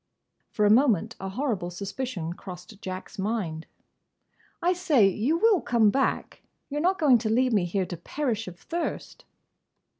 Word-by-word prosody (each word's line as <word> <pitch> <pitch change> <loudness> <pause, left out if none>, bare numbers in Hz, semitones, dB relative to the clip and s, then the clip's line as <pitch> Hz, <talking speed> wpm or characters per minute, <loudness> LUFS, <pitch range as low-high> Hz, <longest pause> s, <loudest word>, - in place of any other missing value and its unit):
For 210 - +1
a 205 - +5
moment 230 - +3
a 195 - -4
horrible 205 -5 -2
suspicion 195 -1 -4
crossed 185 +3 -11
Jack's 185 +3 -7
mind. 190 -6 -2 0.9
"I 355 +2 +2
say! 310 - +4
You 225 - +1
will 420 -1 +4
come 225 -4 +3
back? 270 +3 -1 0.3
You 295 +1 -2
're - - -1
not 370 +3 +2
going 270 -6 +5
to 220 -1 -2
leave 250 +2 +2
me 200 -5 +3
here 185 +2 -1
to 175 - -6
perish 225 - -3
of 180 -1 -9
thirst?" 340 0 -5
220 Hz, 160 wpm, -26 LUFS, 190-275 Hz, 0.9 s, a